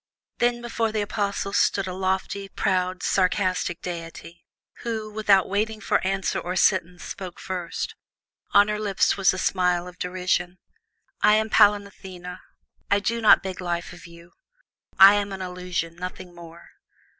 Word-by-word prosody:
Then 240 0 +1
before 230 -1 -1
the 215 -1 -1
Apostles 200 -1 -2
stood 195 - +2
a 185 - -5
lofty, 190 +1 -2
proud, 185 -1 -1
sarcastic 185 -2 0
divinity, 170 -1 -8 0.4
who, 220 -2 -4
without 205 -3 +3
waiting 215 +2 -1
for - - +1
question 195 0 -1
or 180 +1 -3
sentence, 180 -2 +1
spoke 185 -3 -8
first. 180 -3 -4 0.6
On 205 0 +6
her 210 0 -2
lips 205 -3 +1
was 195 -1 +3
a 185 - -5
smile 180 -1 +1
of 180 0 -12
derision. 180 0 -1 0.6
"I 210 0 +6
am 220 0 0
Pallas 205 0 +5
Athene. 180 -2 -10 0.5
I 200 - +3
do 230 +3 -2
not 215 - +6
beg 190 -1 -5
life 175 -1 -3
of 175 0 -13
you. 170 +1 -16 0.7
I 195 +1 +10
am 205 -1 -1
an 190 -1 -5
illusion, 180 -2 -4
nothing 180 0 -7
more. 170 0 -13
185 Hz, 155 wpm, -24 LUFS, 180-205 Hz, 0.7 s, I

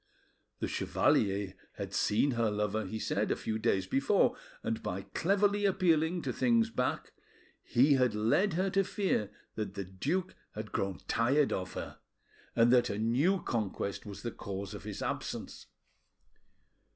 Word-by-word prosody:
The - - 0
chevalier 100 -2 +1 0.2
had - - -6
seen 115 +7 +2
her 115 -2 +1
lover, 105 0 -1
he 110 - -4
said, - - -1
a - - +2
few 110 0 -3
days 100 -4 +1
before, 135 - +2 0.3
and - - -2
by - - -3
cleverly 205 +3 +2
appealing 175 -3 +2
to - - -2
things 230 -2 +2
back, 125 - -2 0.5
he 135 +5 +4
had 125 -5 +3
led 115 - +2
her 185 +3 0
to 195 0 +3
fear 185 - 0 0.2
that 100 -3 -4
the 100 -1 -4
duke 155 - -2 0.2
had 105 0 -6
grown 95 -3 -1
tired 135 +5 +2
of 95 0 -3
her, - - -6 0.6
and 120 +1 +5
that 120 -1 +4
a 100 - -2
new 135 - +2
conquest 100 -3 -2
was 100 -1 -9
the 120 - -2
cause 100 0 -6
of 100 - -8
his 105 -2 -5
absence. - - -4
115 Hz, 155 wpm, -32 LUFS, -, 0.6 s, and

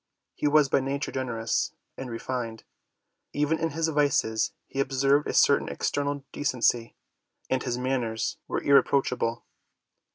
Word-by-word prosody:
He - - -1
was 150 -1 +5
by 135 - +2
nature 135 +1 -2
generous 120 -4 -1 0.2
and 130 - -6
re 115 - -4
fined. 115 -3 -4 0.7
Even 150 +2 +1
in 165 0 0
his 160 +2 -1
vices 140 -7 +1
he 135 - -6
observed 135 +2 +2
a - - -2
certain 140 - +4
external 145 -1 -2
decency, 120 -4 0 0.6
and 130 -1 +2
his 120 -1 -2
manners 125 -3 -1
were - - -2
irreproachable. 130 -4 +2
135 Hz, 135 wpm, -27 LUFS, 120-145 Hz, 0.7 s, was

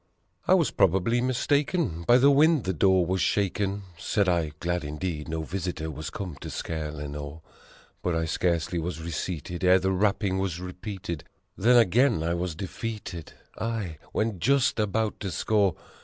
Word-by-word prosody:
"I - - +6
was - - +2
probably 105 +7 +2
mistaken 135 - 0
by 120 - +7
the 140 +3 +6
wind 150 -1 +4
the 95 - -1
door 95 +2 +3
was 95 +1 0
shaken," 100 0 0 0.2
Said 100 0 +1
I, 85 -4 +1
glad 90 -1 -1
indeed, 75 +1 -4
no 80 0 -3
visitor 85 -2 -4
was 75 +1 -6
come 90 -8 -6
to - - -6
scare 80 -2 -4
Lenore; 75 +1 -7 0.6
But 90 -2 0
I 80 0 0
scarcely 85 +1 0
was 80 0 -4
reseated 85 +1 -4
ere 90 +1 +6
the 95 +1 0
rapping 100 0 +1
was 95 -3 -2
repeated, 90 -3 -6 0.3
And 120 +5 +5
again 115 - +4
I 85 +1 0
was 85 -1 -2
defeated 100 -2 -6 0.3
aye, 110 -9 -3
when 110 -4 -1
just 135 +3 +2
about 105 +1 0
to 100 - -3
score 100 0 +1
95 Hz, 160 wpm, -27 LUFS, 80-105 Hz, 0.6 s, by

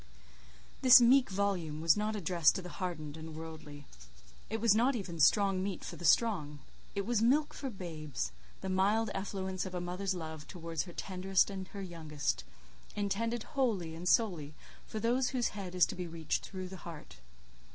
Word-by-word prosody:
This 255 -1 +10
meek 250 +2 +5
volume 190 -6 -1
was 165 0 +5
not 210 +1 -1
addressed 170 -4 +3
to 190 - -3
the 180 - -7
hardened 155 -5 -4
and 160 0 -8
worldly; 155 -2 -9 0.6
it 225 +2 -2
was 225 -2 +5
not 245 +5 +3
even 180 -7 -5
strong 195 +4 +4
meat 195 -1 -3
for - - -6
the 175 - -7
strong: 165 -10 +3 0.4
it 200 -1 -1
was 235 -2 +1
milk 285 +6 +3
for 275 - -4
babes: 160 - -5 0.3
the - - -4
mild 200 +4 +2
effluence 190 -1 -3
of 185 -1 -6
a - - -1
mother's 180 +2 -2
love 160 -3 -7
towards 165 -2 -4
her 175 - -10
tenderest 190 +2 +1
and 190 -1 -5
her 200 -1 -7
youngest; 150 - -3 0.5
intended 215 +3 -1
wholly 220 - -1
and 170 +2 -2
solely 165 -10 +2 0.3
for 215 - -4
those 245 +3 +2
whose 250 -3 0
head 190 -3 -7
is 180 - +6
to - - -6
be 180 -1 -5
reached 165 -1 -2
through 185 -1 -6
the 190 - -8
heart. 165 - -10
185 Hz, 180 wpm, -33 LUFS, 165-210 Hz, 0.6 s, This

